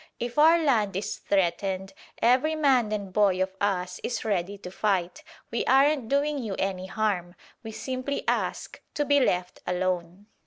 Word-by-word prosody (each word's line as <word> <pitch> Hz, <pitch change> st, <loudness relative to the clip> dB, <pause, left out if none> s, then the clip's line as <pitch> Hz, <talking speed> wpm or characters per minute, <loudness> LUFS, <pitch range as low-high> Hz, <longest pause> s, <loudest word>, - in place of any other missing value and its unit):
If 240 Hz, +4 st, -3 dB
our 325 Hz, +3 st, +7 dB
land 230 Hz, -, +1 dB
is 195 Hz, -, -3 dB
threatened, 190 Hz, +1 st, -1 dB, 0.3 s
every 260 Hz, +7 st, +3 dB
man 265 Hz, -8 st, +3 dB
and 200 Hz, -3 st, -4 dB
boy 195 Hz, -3 st, +3 dB
of 190 Hz, 0 st, -1 dB
us 180 Hz, -3 st, -1 dB
is 240 Hz, -, -3 dB
ready 200 Hz, -1 st, -1 dB
to 180 Hz, -2 st, -9 dB
fight. 190 Hz, -3 st, -1 dB, 0.3 s
We 230 Hz, -, -1 dB
aren't 270 Hz, -2 st, +3 dB
doing 285 Hz, +1 st, +1 dB
you 215 Hz, -6 st, -4 dB
any 190 Hz, -1 st, -2 dB
harm: 190 Hz, -4 st, -2 dB, 0.3 s
we 225 Hz, -, -7 dB
simply 255 Hz, +4 st, -4 dB
ask -, -, -2 dB
to 295 Hz, -, 0 dB
be 285 Hz, 0 st, +4 dB
left 180 Hz, -8 st, 0 dB
alone." 180 Hz, +1 st, -2 dB
205 Hz, 160 wpm, -26 LUFS, 185-260 Hz, 0.3 s, our